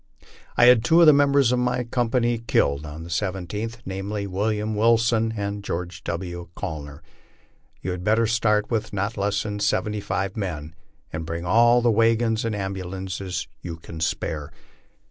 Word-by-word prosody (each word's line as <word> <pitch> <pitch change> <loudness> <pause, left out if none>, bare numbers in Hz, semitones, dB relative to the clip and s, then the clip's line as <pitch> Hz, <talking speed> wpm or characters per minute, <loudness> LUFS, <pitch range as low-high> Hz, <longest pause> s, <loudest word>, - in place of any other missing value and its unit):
I 120 - +7
had 120 -2 +7
two 160 +8 +5
of - - +8
the 155 - +9
members 140 -3 +4
of 125 - +2
my 125 0 0
company 120 0 0
killed 75 -10 +1
on 75 +2 -8
the 85 - -9
I7th, 100 +5 -3
namely, 100 +2 -4
William 105 +3 -1
Wilson 115 0 +3
and 100 0 -3
George 85 -2 -4
W. 85 0 -4
Gainer. 75 -3 -6 0.8
Yon 90 - -2
had 90 0 -5
better 110 +3 +3
start 105 -1 +1
with 115 -1 -1
not 100 +3 -2
less 100 0 0
than 105 -1 -4
seventy 105 0 0
five 95 0 -2
men 80 -7 -4 0.4
and 80 0 -3
bring 85 +2 -4
all 120 +5 +5
the 120 - +4
wagons 115 0 +2
and 115 -2 -1
ambulances 95 -2 -4
you 85 -2 -6
can 80 0 -10
spare. 75 -2 -2
105 Hz, 165 wpm, -24 LUFS, 90-115 Hz, 0.8 s, the